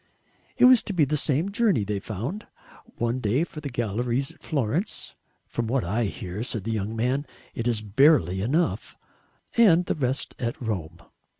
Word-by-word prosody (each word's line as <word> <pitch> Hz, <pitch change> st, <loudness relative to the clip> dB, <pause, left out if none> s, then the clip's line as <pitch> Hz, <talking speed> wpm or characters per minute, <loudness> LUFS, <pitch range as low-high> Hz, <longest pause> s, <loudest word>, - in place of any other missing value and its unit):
It -, -, +6 dB
was 250 Hz, -2 st, +8 dB
to 205 Hz, -, -4 dB
be 165 Hz, -5 st, +4 dB
the 150 Hz, +3 st, -1 dB
same 155 Hz, +5 st, +1 dB
journey, 205 Hz, -, +2 dB
they 100 Hz, 0 st, -2 dB
found; 115 Hz, -, -5 dB, 0.5 s
one 120 Hz, +2 st, 0 dB
day 125 Hz, +6 st, +1 dB
for 155 Hz, -3 st, -7 dB
the 145 Hz, -, -4 dB
galleries 120 Hz, +3 st, -1 dB
at -, -, -22 dB
Florence 150 Hz, -, -2 dB, 0.3 s
"from 120 Hz, -1 st, -3 dB
what 130 Hz, +2 st, +1 dB
I 110 Hz, +7 st, 0 dB
hear," 95 Hz, 0 st, -5 dB
said 115 Hz, -4 st, -3 dB
the 115 Hz, -, -3 dB
young 110 Hz, 0 st, -2 dB
man, 130 Hz, +5 st, 0 dB, 0.3 s
"it 115 Hz, -, -3 dB
is 115 Hz, -3 st, 0 dB
barely 100 Hz, -, +4 dB
enough," 155 Hz, -, -1 dB, 0.6 s
and 180 Hz, -7 st, +6 dB
the -, -, 0 dB
rest 135 Hz, -2 st, -2 dB
at 120 Hz, -1 st, -3 dB
Rome. 90 Hz, -8 st, -4 dB
120 Hz, 175 wpm, -25 LUFS, 110-150 Hz, 0.6 s, was